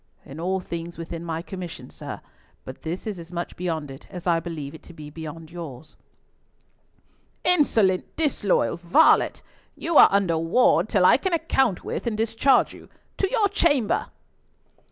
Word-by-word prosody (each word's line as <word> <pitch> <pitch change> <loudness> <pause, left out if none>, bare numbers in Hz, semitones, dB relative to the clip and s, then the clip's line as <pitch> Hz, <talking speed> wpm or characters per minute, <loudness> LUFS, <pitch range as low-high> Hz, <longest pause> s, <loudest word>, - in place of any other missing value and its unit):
"In 140 +3 -10
all 185 +3 -1
things 170 -1 -6
within 165 0 -6
my 165 -1 -4
commission, 180 -2 -8
sir; - - -8 0.4
but - - -9
this 170 +3 -5
is 210 -5 -4
as 170 +1 -11
much 175 0 -5
beyond 160 -5 -3
it, 135 - -12
as 180 -3 -8
I 170 -2 +3
believe 160 -5 -6
it 160 - -11
to 175 - -14
be 150 -2 -10
beyond 160 +1 -8
yours." 160 -5 -9 1.5
"Insolent, 225 - +2
disloyal 205 - +1
varlet! 175 - +3 0.3
You 330 -1 0
are - - +9
under 190 -5 +2
ward 170 +2 +3
till 190 -4 +3
I - - +7
can 365 +6 -2
account 270 - +1
with - - -4
and 220 -2 -1
discharge 230 +4 +2
you. - - -14 0.3
To 390 - +1
your 440 -3 +2
chamber!" 290 - +1
180 Hz, 160 wpm, -24 LUFS, 165-230 Hz, 1.5 s, are